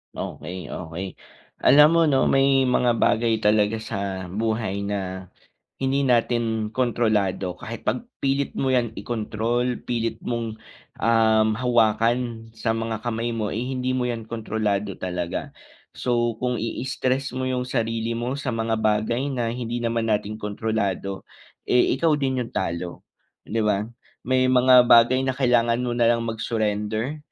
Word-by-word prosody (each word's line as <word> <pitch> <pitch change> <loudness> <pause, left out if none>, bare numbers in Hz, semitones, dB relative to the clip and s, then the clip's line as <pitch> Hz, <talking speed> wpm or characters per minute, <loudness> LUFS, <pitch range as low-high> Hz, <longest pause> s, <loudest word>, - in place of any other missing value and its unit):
Okey, 90 +4 -6
okey, 90 +2 -6 0.5
alam 150 +3 +7
mo 170 - +5
’no, 140 -4 +3
may 135 -1 +4
mga 120 -2 +2
bagay 115 0 +2
talaga 105 +1 +2
sa 100 -3 -4
buhay 110 0 -2
na, 95 -2 -4 0.5
hindi 135 +1 +1
natin 115 -2 +1
kontrolado 110 -6 0
kahit 115 +1 -7
’pag 235 - -2 0.2
pilit 140 0 0
mo 135 - 0
’yan 120 -3 +1
ikontrol, 120 +2 -2
pilit 115 -2 -2
mong, 115 -2 -3 0.5
um, 110 -1 +3
hawakan 115 -1 +1
sa 115 0 -2
mga 115 -1 -2
kamay 115 0 -2
mo, 110 -2 -2
eh, 115 +4 -3
hindi 130 -1 -2
mo 130 -1 0
’yan 115 -2 -3
kontrolado 105 -3 -2
talaga. 90 -2 -4 0.4
So, 120 -2 -1
kung 125 0 -1
i-stress 130 +2 -2
mo 130 - -2
’yong 125 -1 -1
sarili 115 -2 -1
mo 120 +4 -3
sa 130 -4 -3
mga 115 0 -1
bagay 110 +4 +1
na 125 -5 -1
hindi 120 0 -4
naman 115 -1 0
natin 105 0 -1
kontrolado, 100 -2 -2 0.4
eh, 125 +1 +3
ikaw 160 +1 +3
din 135 -3 -1
’yong - - -17
talo, 85 -2 -3 0.4
’di 115 - -4
ba? 105 0 0 0.3
May 130 0 +2
mga 125 -1 +6
bagay 120 +2 +6
na 130 - 0
kailangan 120 -2 +2
mo 125 - -1
na 120 - +4
lang 115 - -2
mag-surrender 110 +3 -2
115 Hz, 145 wpm, -24 LUFS, 110-125 Hz, 0.5 s, alam